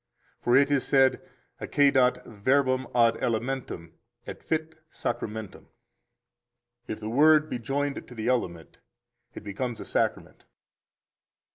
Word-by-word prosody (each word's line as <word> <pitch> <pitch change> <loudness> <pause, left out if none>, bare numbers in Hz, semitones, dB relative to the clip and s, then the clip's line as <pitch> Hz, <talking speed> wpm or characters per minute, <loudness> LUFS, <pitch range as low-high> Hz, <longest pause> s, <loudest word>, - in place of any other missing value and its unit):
For 120 - +2
it 140 +1 +4
is 140 -2 +2
said: 135 -1 +3 0.4
Accedat 130 -3 +3
verbum 130 +4 +1
ad 115 -1 +4
elementum, 115 -7 -3 0.3
et - - -8
fit 160 0 -2 0.2
sacramentum. 110 -3 -5 1.2
If 110 - -5
the 110 - -6
Word 150 +5 +4
be 125 - -2
joined 140 +4 -3
to 125 - -12
the 110 0 -4
element, 85 -11 -2 0.6
it - - -8
becomes 115 +4 -4
a - - -7
Sacrament. - - -2
125 Hz, 120 wpm, -27 LUFS, 110-140 Hz, 1.2 s, it